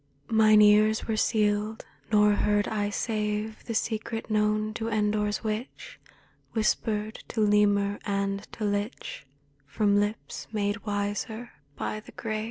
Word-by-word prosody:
Mine 215 Hz, -1 st, +6 dB
ears 215 Hz, +1 st, +5 dB
were 220 Hz, -, 0 dB
sealed, 215 Hz, 0 st, +1 dB, 0.3 s
nor 210 Hz, -1 st, +5 dB
heard 205 Hz, 0 st, +1 dB
I 205 Hz, -1 st, -1 dB
save 210 Hz, 0 st, -2 dB
The 230 Hz, -, -4 dB
secret 225 Hz, 0 st, -2 dB
known 215 Hz, 0 st, +1 dB
to 225 Hz, 0 st, -3 dB
Endor's 210 Hz, -1 st, 0 dB
witch 225 Hz, -, -5 dB, 0.3 s
— -, -, -37 dB
Whispered 215 Hz, -1 st, -1 dB
to 235 Hz, -, -4 dB
lemur 205 Hz, -1 st, +3 dB
and 200 Hz, -1 st, -1 dB
to 225 Hz, -, -6 dB
lich 205 Hz, -, -3 dB, 0.4 s
From 205 Hz, +6 st, +2 dB
lips 205 Hz, +1 st, -3 dB
made 210 Hz, 0 st, -2 dB
wiser 205 Hz, +3 st, -3 dB, 0.2 s
by 215 Hz, -, -3 dB
the 215 Hz, -, -15 dB
grave. 215 Hz, -1 st, -3 dB
210 Hz, 135 wpm, -27 LUFS, 205-220 Hz, 0.4 s, Mine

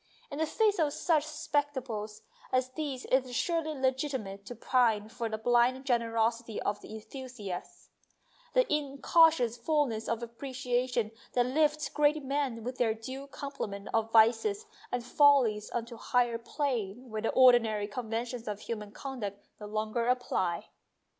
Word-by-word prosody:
In 285 Hz, -, -5 dB
the 320 Hz, -, +1 dB
face 420 Hz, +2 st, +2 dB
of 300 Hz, -3 st, +2 dB
such 310 Hz, -3 st, +1 dB
spectacles 260 Hz, -8 st, -3 dB, 0.3 s
as 255 Hz, 0 st, +1 dB
these 275 Hz, -2 st, -4 dB
it 260 Hz, 0 st, +5 dB
is 245 Hz, -, -7 dB
surely 315 Hz, -1 st, -1 dB
legitimate 260 Hz, -7 st, -2 dB
to 245 Hz, -, -6 dB
pine 225 Hz, -3 st, +2 dB
for 235 Hz, 0 st, -4 dB
the 220 Hz, -, -3 dB
blind 245 Hz, +3 st, +2 dB
generosity 230 Hz, -2 st, 0 dB
of 205 Hz, 0 st, -1 dB
the 220 Hz, -, -9 dB
enthusiast, 220 Hz, -5 st, -8 dB, 0.6 s
that -, -, +5 dB
in 285 Hz, -2 st, -1 dB
cautious 320 Hz, -10 st, +4 dB
fullness 240 Hz, -4 st, 0 dB
of 230 Hz, 0 st, -1 dB
appreciation 245 Hz, -1 st, -2 dB, 0.2 s
that 245 Hz, -1 st, +3 dB
lifts 300 Hz, +2 st, +1 dB
great 300 Hz, 0 st, +2 dB
men 270 Hz, -4 st, -1 dB
with 250 Hz, +2 st, -5 dB
their 225 Hz, -3 st, +2 dB
due 260 Hz, +5 st, -7 dB
complement 275 Hz, -9 st, -6 dB
of 225 Hz, 0 st, +1 dB
vices 245 Hz, -, +4 dB, 0.3 s
and 245 Hz, -1 st, -2 dB
follies 250 Hz, -7 st, +4 dB
on 235 Hz, -1 st, -2 dB
to 235 Hz, -, -11 dB
a -, -, -9 dB
higher 240 Hz, -2 st, +1 dB
plane 240 Hz, -3 st, -3 dB
where 215 Hz, 0 st, -3 dB
the 225 Hz, -, 0 dB
ordinary 235 Hz, -5 st, +5 dB
conventions 230 Hz, +2 st, -4 dB
of 210 Hz, -1 st, -4 dB
human 210 Hz, -3 st, -5 dB
conduct 210 Hz, -7 st, -6 dB
no 210 Hz, -, -7 dB
longer 215 Hz, +2 st, -1 dB
apply. 215 Hz, -9 st, 0 dB
245 Hz, 155 wpm, -30 LUFS, 220-275 Hz, 0.6 s, it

